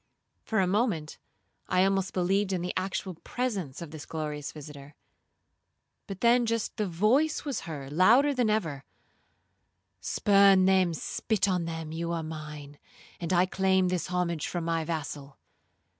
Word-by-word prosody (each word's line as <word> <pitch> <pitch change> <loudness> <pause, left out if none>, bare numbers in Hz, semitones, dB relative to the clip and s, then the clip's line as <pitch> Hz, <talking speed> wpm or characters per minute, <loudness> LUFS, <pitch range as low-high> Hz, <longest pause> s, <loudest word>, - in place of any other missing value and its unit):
1 - - -45
For 220 - 0
a 190 - +3
moment 185 -6 -1 0.5
I 185 0 +3
almost 195 -1 +1
believed 195 +2 +1
in 180 -2 -1
the 180 - -3
actual 190 0 -2
presence 190 - -4
of 160 - -10
this 155 -2 -9
glorious 150 -2 -4
visitor, 145 -1 -11 1.1
but 195 -2 -7 0.3
just 230 -1 -2
then 215 - 0
the - - -7
voice 255 - +2
was 280 -5 -2
heard 140 -3 -6
louder 235 - +5
than 245 -4 +1
ever, 165 -11 -1 1.2
'Spurn 195 - +4
them,—spit 190 +3 +1
on 180 -3 0
them,—you 165 0 -4
are 165 -1 -2
mine, 150 -2 -8 0.4
and 170 -1 -4
I 180 0 +4
claim 190 -1 +2
this 180 -3 -1
homage 175 -3 -1
from 175 -2 -3
my 165 -1 0
vassal.' 150 -3 -5
180 Hz, 145 wpm, -28 LUFS, 155-195 Hz, 1.2 s, louder